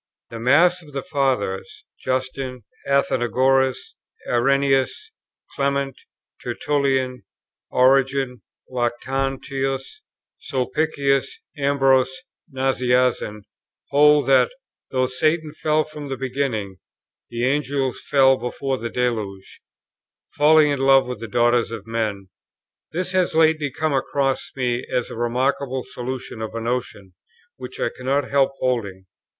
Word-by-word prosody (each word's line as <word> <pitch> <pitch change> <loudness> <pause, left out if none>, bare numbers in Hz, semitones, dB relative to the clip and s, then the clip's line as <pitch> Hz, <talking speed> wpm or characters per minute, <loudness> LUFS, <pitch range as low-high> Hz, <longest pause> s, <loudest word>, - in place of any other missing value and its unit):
The 115 - -6
mass 170 +9 +4
of 150 -3 -16
the 135 -1 -3
Fathers 125 -10 -2
(Justin, 130 -1 -3 0.2
Athenagoras, 130 - +1 0.3
Irenæus, 135 +2 +3 0.6
Clement, 140 -1 -1 0.5
Tertullian, 135 -3 0 0.5
Origen, 135 0 +2 0.3
Lactantius, 135 - -2 0.4
Sulpicius, 140 0 0 0.2
Ambrose, 135 -1 +2 0.3
Nazianzen,) 125 -5 +1 0.5
hold 150 +1 +5
that, 130 -2 +4 0.4
though 130 -1 +1
Satan 155 +4 0
fell 155 0 +1
from 150 -2 -9
the 135 - -3
beginning, 125 -7 -2 0.5
the 120 +1 -2
Angels 135 -1 -1
fell 135 -2 +5
before 130 +2 -3
the 115 - -4
deluge, 110 -6 -3 0.7
falling 150 0 +5
in 140 - -1
love 135 0 +5
with 125 -3 -5
the 115 - -6
daughters 120 +1 +2
of 115 -3 -7
men. 110 -4 -3 0.6
This 180 +3 -2
has 185 -3 +1
lately 155 -2 +3
come 155 +3 -1
across 135 0 0
me 125 -2 -1
as 125 -1 -1
a - - -6
remarkable 130 +2 -1
solution 125 -2 -6
of 110 +1 -5
a - - -2
notion 115 -5 -4 0.4
which 130 0 -9
I 115 - 0
cannot 135 +3 -1
help 140 -1 +3
holding. 105 -7 -2
130 Hz, 110 wpm, -22 LUFS, 125-140 Hz, 0.7 s, hold